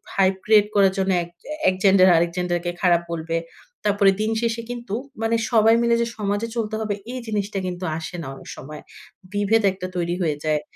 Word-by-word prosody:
Hype 190 Hz, -1 st, +3 dB
create 210 Hz, -1 st, +5 dB
করার 195 Hz, -2 st, +5 dB
জন্য 190 Hz, 0 st, +1 dB
এক 170 Hz, -, -11 dB, 0.4 s
এক 185 Hz, -, -1 dB
জেন্ডার 190 Hz, -1 st, +6 dB
আরেক 170 Hz, 0 st, +1 dB
জেন্ডার 175 Hz, -1 st, 0 dB
কে 175 Hz, -, 0 dB
খারাপ 175 Hz, -2 st, +4 dB
বলবে। 165 Hz, 0 st, -2 dB, 0.5 s
তারপরে 200 Hz, -1 st, +4 dB
দিন 220 Hz, +1 st, 0 dB
শেষে 230 Hz, 0 st, -1 dB
কিন্তু 235 Hz, -4 st, -6 dB, 0.3 s
মানে 225 Hz, +1 st, +2 dB, 0.2 s
সবাই 225 Hz, 0 st, +5 dB
মিলে 235 Hz, 0 st, +3 dB
যে 235 Hz, -, 0 dB
সমাজে 205 Hz, +2 st, -1 dB
চলতে 220 Hz, -1 st, -2 dB
হবে 210 Hz, -2 st, -1 dB, 0.2 s
এই 255 Hz, -, -4 dB
জিনিসটা 205 Hz, -1 st, -2 dB
কিন্তু 180 Hz, 0 st, -5 dB
আসে 165 Hz, +2 st, -6 dB
না 140 Hz, -, -7 dB
অনেক -, -, -12 dB
সময়। 150 Hz, +2 st, -9 dB, 0.5 s
বিভেদ 205 Hz, +2 st, +2 dB
একটা 185 Hz, -1 st, -6 dB
তৈরি 175 Hz, 0 st, -1 dB
হয়ে 155 Hz, -4 st, 0 dB
যায়। 155 Hz, -1 st, +1 dB
195 Hz, 195 wpm, -23 LUFS, 175-215 Hz, 0.5 s, জেন্ডার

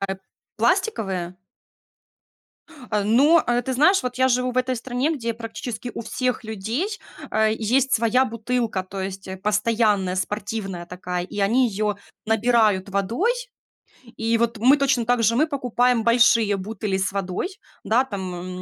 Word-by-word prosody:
А, 195 Hz, -, -1 dB
эп 190 Hz, -, -18 dB, 0.4 s
пластиковые? 195 Hz, -, 0 dB, 1.7 s
Э, 210 Hz, -1 st, +1 dB
ну, 280 Hz, +10 st, +5 dB
э, 245 Hz, 0 st, +1 dB
ты 260 Hz, -, -3 dB
знаешь, 340 Hz, +9 st, +4 dB
вот 250 Hz, -1 st, -4 dB
я 260 Hz, 0 st, +4 dB
живу 250 Hz, 0 st, +1 dB
в -, -, -10 dB
этой 255 Hz, 0 st, +1 dB
стране, 255 Hz, +6 st, -1 dB
где 230 Hz, -4 st, -3 dB
практически 230 Hz, +1 st, -6 dB
у -, -, -4 dB
всех 250 Hz, +1 st, -2 dB
людей, 220 Hz, -, -2 dB, 0.4 s
э, 220 Hz, 0 st, +2 dB
есть 245 Hz, +5 st, +1 dB
своя 235 Hz, +3 st, +3 dB
бутылка. 230 Hz, -3 st, -2 dB
То 190 Hz, +1 st, -7 dB
есть, 190 Hz, 0 st, -6 dB
э, 190 Hz, -, -5 dB
постоянная 210 Hz, -2 st, +1 dB
спортивная 195 Hz, -2 st, -4 dB
такая, 180 Hz, 0 st, -4 dB
и 200 Hz, -, -9 dB
они 240 Hz, +6 st, +3 dB
её 210 Hz, 0 st, -1 dB, 0.3 s
набирают 220 Hz, -3 st, +2 dB
водой. 200 Hz, -, 0 dB, 0.9 s
И 225 Hz, +1 st, +1 dB
вот 235 Hz, 0 st, 0 dB
мы 255 Hz, +7 st, +5 dB
точно 270 Hz, -4 st, +1 dB
так 245 Hz, 0 st, +2 dB
же. 230 Hz, +2 st, +3 dB
Мы 305 Hz, +5 st, +3 dB
покупаем 250 Hz, -4 st, +1 dB
большие 230 Hz, -3 st, +4 dB
бутыли 200 Hz, 0 st, -3 dB
с 190 Hz, +1 st, -1 dB
водой. 190 Hz, -, -2 dB, 0.4 s
Да, 235 Hz, +4 st, +3 dB
там 200 Hz, -7 st, -5 dB
м 180 Hz, +1 st, -7 dB
225 Hz, 160 wpm, -23 LUFS, 200-250 Hz, 1.7 s, ну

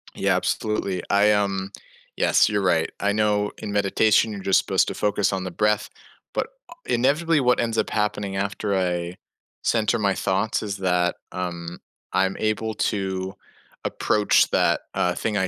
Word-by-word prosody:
Yeah, -, -, +1 dB
absolutely. 100 Hz, -4 st, -1 dB
I, 100 Hz, +1 st, +4 dB
um, 100 Hz, -1 st, 0 dB, 0.5 s
yes, -, -, +4 dB
you're 105 Hz, -1 st, 0 dB
right. 85 Hz, -3 st, +2 dB
I 100 Hz, 0 st, +1 dB
know 105 Hz, -1 st, +1 dB
in 100 Hz, -, -6 dB
meditation, 105 Hz, +2 st, +3 dB
you're 100 Hz, -, -6 dB
just 95 Hz, -, +3 dB
supposed -, -, +1 dB
to -, -, -4 dB
focus 105 Hz, -1 st, 0 dB
on 95 Hz, -1 st, -2 dB
the 95 Hz, -, -5 dB
breath. 105 Hz, +3 st, +1 dB, 0.4 s
But, -, -, -1 dB, 0.2 s
uh, 335 Hz, -, -10 dB
inevitably, 150 Hz, +6 st, +2 dB
what 125 Hz, -1 st, +3 dB
ends 115 Hz, -1 st, -1 dB
up -, -, +1 dB
happening 105 Hz, -2 st, -1 dB
after 100 Hz, +1 st, -2 dB
I 90 Hz, -1 st, -1 dB, 0.5 s
center 110 Hz, -1 st, +1 dB
my 100 Hz, -2 st, +2 dB
thoughts 100 Hz, +4 st, -1 dB
is 100 Hz, -1 st, -4 dB
that, 90 Hz, -2 st, +1 dB, 0.2 s
um, 85 Hz, -2 st, -5 dB, 0.3 s
I'm 95 Hz, 0 st, +1 dB
able 110 Hz, +1 st, -1 dB
to 95 Hz, -2 st, -2 dB, 0.5 s
approach 105 Hz, -1 st, +2 dB
that, -, -, +2 dB
uh, 90 Hz, 0 st, 0 dB
thing 105 Hz, -2 st, -1 dB
I 95 Hz, -, +1 dB
100 Hz, 165 wpm, -24 LUFS, 95-105 Hz, 0.5 s, I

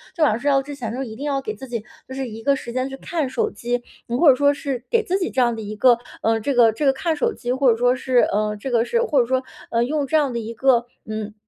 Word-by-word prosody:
就 330 Hz, -, +1 dB
晚 300 Hz, -, +5 dB
上 215 Hz, -, -1 dB
睡 285 Hz, -, 0 dB
觉 275 Hz, -1 st, +4 dB
之 290 Hz, +2 st, -8 dB
前 230 Hz, -5 st, -5 dB
呢， 265 Hz, +2 st, -3 dB
一 220 Hz, -3 st, -8 dB
定 275 Hz, +6 st, -6 dB
要 275 Hz, -2 st, 0 dB
给 430 Hz, -, -4 dB
自 265 Hz, -, -10 dB
己 235 Hz, -3 st, -4 dB, 0.2 s
就 260 Hz, -, -8 dB
是 265 Hz, -1 st, -3 dB
一 220 Hz, 0 st, -8 dB
个 280 Hz, +2 st, +3 dB
时 240 Hz, -3 st, -7 dB
间 255 Hz, +2 st, -1 dB
去 270 Hz, -, -6 dB
看 315 Hz, 0 st, -2 dB
手 -, -, 0 dB
机， 240 Hz, +3 st, -3 dB, 0.2 s
嗯， 235 Hz, -, -1 dB
或 310 Hz, +2 st, +6 dB
者 265 Hz, -, +7 dB
说 285 Hz, +2 st, +3 dB
是 275 Hz, -4 st, -4 dB
给 465 Hz, -2 st, +2 dB
自 380 Hz, -1 st, 0 dB
己 360 Hz, -, -1 dB
这 260 Hz, -, 0 dB
样 240 Hz, -1 st, +3 dB
的 225 Hz, -, -6 dB
一 210 Hz, 0 st, -6 dB
个 240 Hz, +2 st, +5 dB, 0.2 s
呃， 225 Hz, 0 st, +2 dB
这 275 Hz, +6 st, -1 dB
个 235 Hz, -3 st, +5 dB
这 255 Hz, +7 st, -3 dB
个 270 Hz, -, +5 dB
看 320 Hz, +4 st, -1 dB
手 290 Hz, -, 0 dB
机， 240 Hz, -, -4 dB
或 260 Hz, 0 st, +3 dB
者 -, -, +2 dB
说 245 Hz, +1 st, +3 dB
是， 255 Hz, -1 st, +1 dB
呃 210 Hz, 0 st, 0 dB
这 240 Hz, +6 st, -5 dB
个 235 Hz, -1 st, +2 dB
是 470 Hz, -, +1 dB
或 325 Hz, -, +2 dB
者 240 Hz, -, +3 dB
说， 260 Hz, +2 st, 0 dB, 0.3 s
呃， 230 Hz, 0 st, +2 dB
用 290 Hz, +3 st, -1 dB
这 315 Hz, -, 0 dB
样 290 Hz, -4 st, +1 dB
的 235 Hz, -, -2 dB
一 225 Hz, 0 st, -6 dB
个， 240 Hz, 0 st, +3 dB, 0.2 s
嗯， 215 Hz, -1 st, -5 dB
255 Hz, 335 characters per minute, -22 LUFS, 230-280 Hz, 0.3 s, 者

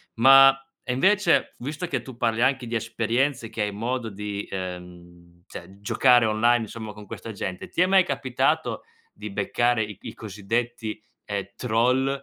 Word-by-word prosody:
ma, 135 Hz, +3 st, +8 dB, 0.3 s
e 125 Hz, -, -2 dB
invece 190 Hz, +6 st, +2 dB
visto 150 Hz, +7 st, -5 dB
che -, -, -3 dB
tu 130 Hz, -3 st, -11 dB
parli 115 Hz, 0 st, +1 dB
anche 130 Hz, -2 st, +1 dB
di 115 Hz, -, -3 dB
esperienze 115 Hz, +2 st, -1 dB
che 110 Hz, -, -2 dB
hai 105 Hz, -, -2 dB
modo 115 Hz, +2 st, -3 dB
di, 100 Hz, 0 st, -5 dB
ehm 90 Hz, -2 st, -9 dB
cioè 95 Hz, +1 st, -11 dB
giocare 120 Hz, +3 st, +4 dB
online 115 Hz, +2 st, +2 dB
insomma 110 Hz, 0 st, -8 dB
con 105 Hz, -1 st, -12 dB
questa 115 Hz, -, -7 dB
gente, 95 Hz, -3 st, -5 dB
ti -, -, -1 dB
è 180 Hz, -, +4 dB
mai 190 Hz, -1 st, +5 dB
capitato 135 Hz, -6 st, -1 dB, 0.3 s
di 105 Hz, 0 st, -8 dB
beccare 120 Hz, +4 st, +1 dB
i 105 Hz, -2 st, -8 dB
i 110 Hz, -, -8 dB
cosiddetti, 110 Hz, +1 st, -4 dB, 0.2 s
ehm, 100 Hz, -2 st, -3 dB
troll, 125 Hz, +3 st, +1 dB
115 Hz, 160 wpm, -25 LUFS, 105-125 Hz, 0.3 s, ma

